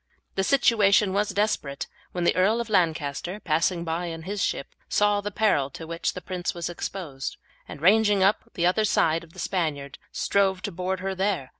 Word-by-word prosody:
The 195 - 0
situation 210 -5 +4
was 205 +1 +1
desperate 195 -9 -1 0.3
when 175 - -2
the - - +3
Earl 205 +5 +3
of 235 -2 -4
Lancaster, 170 0 0
passing 170 0 +1
by 170 +1 -2
in 165 -1 -6
his 200 +3 -2
ship, - - -2 0.2
saw 205 0 +3
the 205 - -3
peril 190 -9 +2
to 160 +4 -9
which 165 +1 -2
the 180 - -7
prince 180 0 -3
was 170 0 -3
exposed, 165 -6 -5 0.3
and, - - -9
ranging 205 +1 +5
up 200 +3 +4
on - - -27
the 170 - +1
other 185 +5 +3
side 165 -5 +2
of 165 0 -17
the - - -17
Spaniard, 150 -7 -2
strove 190 -2 +1
to 205 - -3
board 185 +1 -3
her 195 0 -2
there. 190 -8 -1
185 Hz, 195 wpm, -26 LUFS, 165-205 Hz, 0.3 s, ranging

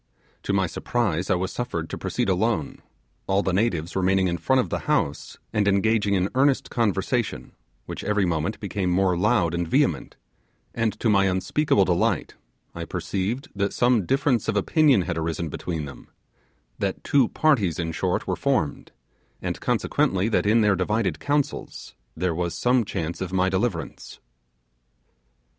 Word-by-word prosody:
To - - -2
my 95 -1 +2
surprise, 95 -1 -1
I 95 - +4
was 95 +1 -2
suffered 105 -10 -3
to - - -3
proceed - - -2
alone; 95 -3 0 0.5
all 100 +1 +2
the 95 - -1
natives 90 -5 0
remaining 95 0 +2
in 85 -1 -2
front 130 - +2
of 125 - 0
the - - -2
house, 70 - -1 0.2
and 105 -2 +1
engaging 100 +1 +2
in 95 0 +1
earnest 135 +1 +2
conversation, 115 +1 -1 0.3
which - - -6
every 105 -2 +1
moment 85 +4 -1
became 100 -3 -2
more 90 0 +2
loud 90 -3 +2
and 85 0 -1
vehement; - - +1 0.6
and 115 -2 -1
to - - +1
my 100 -2 +4
unspeakable 95 +4 +2
delight, 90 -1 0 0.4
I - - -5
perceived 105 +8 -3
that 100 0 -1
some 120 -7 +2
difference 135 -4 +1
of - - 0
opinion 140 - +3
had 85 -2 -3
arisen 80 0 -2
between 80 0 -4
them; 70 - -11 0.7
that - - -2
two 135 -4 +3
parties, 110 - +2
in 85 -1 -2
short, - - -1
were - - -1
formed, - - -1 0.5
and - - -4
consequently 95 +3 +1
that 105 - +1
in 115 +2 +4
their 105 -2 +3
divided 95 -1 0
counsels 145 -1 -2 0.2
there 90 +1 0
was 85 +1 -2
some 125 -1 +2
chance 85 -2 -4
of 95 -1 -3
my 95 0 +2
deliverance. 100 +6 -3
95 Hz, 160 wpm, -24 LUFS, 90-115 Hz, 0.7 s, I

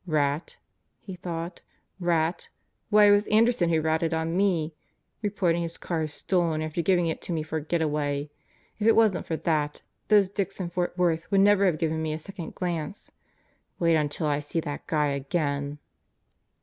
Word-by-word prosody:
Rat? 150 0 0 0.4
he 190 - -8
thought. 170 -1 -5 0.4
Rat? 170 -1 0 0.4
Why 210 -1 +6
it 205 - +7
was 205 +1 +4
Anderson 220 -4 +3
who 160 -1 +2
ratted 160 +1 +1
on 160 +1 -1
me! 175 -5 +1 0.5
Report 200 -5 +1
ing 170 - -1
his 170 0 -4
car 165 -2 -2
as 155 -1 -3
stolen 165 -2 0
after 155 +2 -2
giving 175 0 +2
it 160 - -2
to - - -5
me 160 -2 -1
for 160 +1 -3
a 155 - -4
getaway. 150 -3 -1 0.5
If 210 - +1
it 225 - +6
wasn't 215 -5 +3
for 160 - -1
that, 150 -3 -1 0.2
those 205 -3 +4
dicks 195 -1 -3
in 175 -2 -3
Fort 175 0 -2
Worth 170 -1 +1
would 195 -1 +4
never 200 -1 +5
have 170 -4 +1
given 160 -1 -1
me 155 -1 -1
a - - -3
second 170 0 -8
glance. 175 +1 -4 0.7
Wait 165 -1 +3
until 150 +1 -1
I 145 -1 +1
see 150 +3 -3
that 145 -2 -6
guy 150 -2 +1
again! 140 0 -2
165 Hz, 185 wpm, -27 LUFS, 155-185 Hz, 0.7 s, it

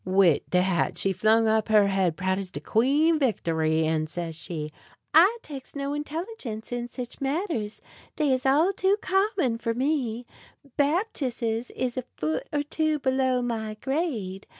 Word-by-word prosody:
Wid 185 -4 +4
dat 180 -1 +1
she 195 - +1
flung 220 +3 +3
up 220 -1 +2
her 215 -2 +5
head 185 -5 +1
proud 190 +1 0
as 195 -2 -5
de 145 - -6
Queen 285 - +2
Victory, 160 - +1
an' 155 0 0
says 165 0 -4
she: 155 -2 -5 0.4
"I 370 +9 +6
takes 275 -3 -9
no 280 0 -2
intelligence 295 - -5
in 240 0 -3
sich 245 +1 -7
matters; 275 - -2 0.3
dey 295 -4 +2
is 255 -1 -1
all 305 +8 +3
too 390 +1 +2
common 380 - +1
for 230 -1 -2
me. 250 -3 -1 0.5
Baptisses 265 - 0
is 255 -1 -2
a 255 - -1
foot 155 +1 -2
or 290 -1 0
two 310 +1 0
below 260 -2 +1
my 220 -3 -3
grade. 245 - -2
245 Hz, 155 wpm, -26 LUFS, 195-295 Hz, 0.5 s, I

